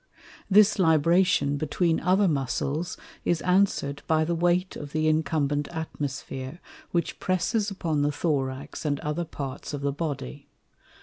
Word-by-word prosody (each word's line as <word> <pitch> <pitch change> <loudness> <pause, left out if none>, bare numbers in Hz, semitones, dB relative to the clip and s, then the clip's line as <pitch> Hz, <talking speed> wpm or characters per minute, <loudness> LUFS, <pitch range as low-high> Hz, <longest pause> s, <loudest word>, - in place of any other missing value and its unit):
This 210 +1 +5
Libration 160 -3 +3
between 160 +3 +1
other 190 +3 +3
Muscles, 150 +3 -1 0.3
is 175 - +1
answer'd 180 -7 +2
by 160 0 +3
the 170 - 0
Weight 175 +2 +1
of 145 -1 -8
the 155 0 +1
incumbent 150 -2 +1
Atmosphere, 145 -2 -5 0.3
which 170 -1 -1
presses 185 +4 0
upon 165 -7 -1
the 145 +1 +2
Thorax 140 -2 -2
and 145 -2 0
other 150 +3 -2
parts 140 -1 -6
of 140 - -6
the 140 0 0
Body. 145 - -5
155 Hz, 135 wpm, -26 LUFS, 145-175 Hz, 0.3 s, This